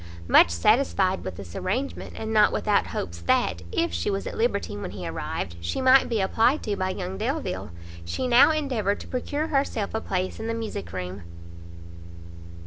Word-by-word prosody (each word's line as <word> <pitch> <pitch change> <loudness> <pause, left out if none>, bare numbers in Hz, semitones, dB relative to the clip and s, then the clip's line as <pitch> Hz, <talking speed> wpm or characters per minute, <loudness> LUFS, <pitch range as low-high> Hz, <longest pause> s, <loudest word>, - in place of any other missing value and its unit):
Much 85 - +7
satisfied 190 - +2
with 95 -2 -5
this 90 -2 -10
arrangement, 250 +9 -3
and 220 0 -4
not 210 -1 +5
without 205 -1 +1
hopes 85 -2 -5
that, 85 0 +1
if - - 0
she 85 0 -1
was 195 0 -2
at - - -5
liberty 220 - 0
when 100 - -5
he - - -6
arrived, 85 - -4
she 85 - -2
might 260 0 +5
be 230 -3 0
applied 225 +9 +2
to 210 - -1
by 185 -1 -1
young 190 0 -4
Delvile, 245 - -2 0.3
she 85 - -3
now 245 +4 +7
endeavoured 260 -10 0
to - - -10
procure 290 +5 -2
herself 275 -8 -1
a 220 - -1
place 185 -2 -2
in 220 - -4
the 230 - -1
music 215 - -5
room. 90 +1 -5
205 Hz, 180 wpm, -25 LUFS, -, 0.3 s, Much